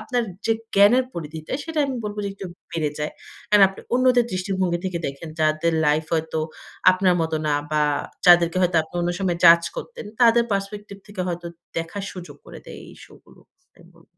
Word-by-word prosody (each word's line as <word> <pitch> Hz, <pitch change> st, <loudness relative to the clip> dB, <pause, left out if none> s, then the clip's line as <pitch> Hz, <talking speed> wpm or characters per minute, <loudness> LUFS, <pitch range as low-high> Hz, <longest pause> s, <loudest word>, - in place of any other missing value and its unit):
আপনার 240 Hz, +3 st, -1 dB, 0.2 s
যে 225 Hz, -, +3 dB, 0.2 s
জ্ঞানের 215 Hz, +6 st, +5 dB
পরিধিটা 160 Hz, -1 st, -7 dB
সেটা 325 Hz, -1 st, -4 dB
আমি 265 Hz, -2 st, -3 dB
বলব 210 Hz, 0 st, -5 dB
যে -, -, -2 dB
একটু 195 Hz, -1 st, -8 dB, 0.2 s
বেড়ে 155 Hz, -3 st, -1 dB
যায়। 150 Hz, +1 st, -3 dB, 0.4 s
কারণ 210 Hz, -1 st, +6 dB
আপনি 195 Hz, -, -12 dB
অন্যদের 250 Hz, -1 st, +4 dB
দৃষ্টিভঙ্গি 185 Hz, -1 st, -1 dB
থেকে 180 Hz, -2 st, -2 dB
দেখেন 140 Hz, +4 st, -7 dB
যাদের 155 Hz, +2 st, +1 dB
লাইফ 150 Hz, +1 st, +2 dB
হয়তো 160 Hz, 0 st, -2 dB, 0.5 s
আপনার 185 Hz, -1 st, +2 dB
মত 160 Hz, 0 st, -2 dB
না 145 Hz, -, +2 dB, 0.2 s
বা 150 Hz, -, +2 dB, 0.4 s
যাদেরকে 175 Hz, 0 st, +6 dB
হয়তো 180 Hz, -1 st, +2 dB
আপনি 160 Hz, -, -17 dB
অন্য 175 Hz, 0 st, 0 dB
সময় 180 Hz, -3 st, -1 dB
জাজ 170 Hz, 0 st, +8 dB
করতেন 485 Hz, -, -7 dB, 0.2 s
তাদের 235 Hz, 0 st, +5 dB
পার্সপেক্টিভ 200 Hz, +1 st, -4 dB
থেকে 205 Hz, -2 st, -7 dB
হয়তো 175 Hz, 0 st, -4 dB, 0.3 s
দেখার 165 Hz, +5 st, -4 dB
সুযোগ 180 Hz, -1 st, -10 dB
করে -, -, -10 dB
দেয় -, -, -10 dB
এই -, -, -13 dB
শো -, -, -19 dB
গুলো। -, -, -20 dB, 0.3 s
তাই -, -, -20 dB
বল -, -, -22 dB
185 Hz, 185 wpm, -23 LUFS, 165-205 Hz, 0.5 s, জাজ